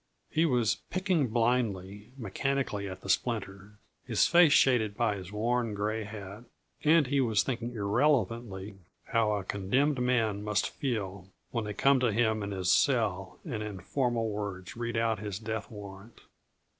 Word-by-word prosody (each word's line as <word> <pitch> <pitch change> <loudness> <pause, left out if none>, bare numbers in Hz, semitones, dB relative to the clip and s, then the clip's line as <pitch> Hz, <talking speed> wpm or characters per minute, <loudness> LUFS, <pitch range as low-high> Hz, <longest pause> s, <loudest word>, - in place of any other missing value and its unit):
He 165 +2 +3
was 120 -6 +2
picking 185 -6 +1
blindly, 110 -3 -1
mechanically 115 -2 -2
at 95 0 -8
the - - -10
splinter, 105 -3 -2 0.3
his 115 -6 +2
face 175 -3 +6
shaded 115 -7 +4
by 115 -4 +1
his 95 -1 -8
worn, 115 +1 0
gray 105 +1 -2
hat; 105 +1 -9 0.4
and 155 0 +5
he 140 +1 +1
was 110 -7 +2
thinking 120 0 -3
irrelevantly 105 -3 0 0.2
how 110 -2 +1
a 100 -2 -2
condemned 125 +10 0
man 115 -5 +1
must 105 -2 0
feel 100 - -3 0.2
when 115 -2 -2
they 105 -1 -5
come 135 +4 +4
to 125 -2 +2
him 110 0 +1
in 100 - -3
his 95 -2 0
cell 110 -8 +1
and 120 -10 -4
in 105 -3 -5
formal 120 - -1
words 100 -3 -5
read 120 0 -3
aloud 115 -2 +1
his 105 -2 -4
death 110 0 -4
warrant. 100 +1 -11
110 Hz, 155 wpm, -30 LUFS, 100-125 Hz, 0.4 s, face